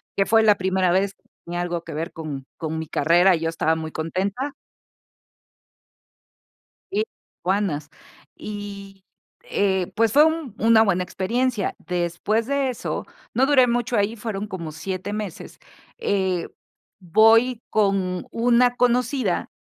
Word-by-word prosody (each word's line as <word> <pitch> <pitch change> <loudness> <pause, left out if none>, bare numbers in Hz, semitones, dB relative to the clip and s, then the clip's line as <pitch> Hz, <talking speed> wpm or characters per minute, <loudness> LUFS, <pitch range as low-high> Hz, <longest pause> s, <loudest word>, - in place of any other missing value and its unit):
que 195 -1 +1
fue 225 +2 +5
la 215 -1 +6
primera 185 -1 +1
vez 195 +2 +1 0.3
tenía 175 +1 -4
algo 175 -1 -3
que - - -8
ver 165 +2 -4
con 150 -4 -6
con 160 0 -4
mi 160 0 -4
carrera 175 +6 +4
y - - -3
yo 165 - 0
estaba 160 0 +1
muy 160 -1 -5
contenta. 195 - -2 2.4
Y 415 +2 +1 0.4
aduanas, 185 -6 -1 0.5
y, 200 -2 -8 0.5
eh, 190 -3 +1
pues 225 -1 +3
fue 295 +2 +7
un 315 -8 -1
una 225 0 +5
buena 185 -4 +1
experiencia. 225 +5 -1
Después 180 +6 -1
de 280 -1 +1
eso, 250 - -4 0.3
no 255 +4 +3
duré 265 -3 +5
mucho 240 0 0
ahí, 205 +2 +1
fueron 210 -2 -4
como 170 -6 -6
7 185 +5 -5
meses, 210 -5 -6 0.4
eh, 190 - 0 0.5
voy 225 +6 +4
con 195 -4 +1
una 245 +1 +3
conocida 245 -4 +1
200 Hz, 135 wpm, -23 LUFS, 175-230 Hz, 2.4 s, fue